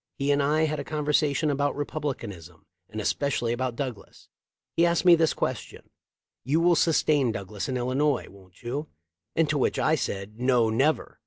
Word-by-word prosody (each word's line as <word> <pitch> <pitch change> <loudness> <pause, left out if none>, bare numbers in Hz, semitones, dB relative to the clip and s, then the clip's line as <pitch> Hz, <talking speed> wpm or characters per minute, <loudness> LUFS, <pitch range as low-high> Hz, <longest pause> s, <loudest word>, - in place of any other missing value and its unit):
He 140 +1 0
and 145 0 +2
I 150 +3 +2
had 155 -1 -1
a - - -3
conversation 150 0 +1
about 145 0 0
Republicanism 115 - -5 0.2
and 110 - -6
especially 120 0 0
about 125 0 -2
Douglas. 125 -5 -7 0.5
He 170 - +3
asked 170 +1 +2
me 175 - +8
this 165 -1 +3
ques - - -1
tion - - -14 0.5
'You 145 +5 +1
will 175 +1 +4
sustain 150 -6 +2
Douglas 100 +2 -5
in 130 - -1
Illinois 130 +3 0
wont 95 -1 -18
you?' 140 +6 -4 0.5
and 165 -1 +3
to 145 -1 0
which - - +1
I 155 - +2
said 105 -7 -3
Wo, 125 -3 +3
never!' 140 +8 0
140 Hz, 175 wpm, -26 LUFS, 115-155 Hz, 0.5 s, me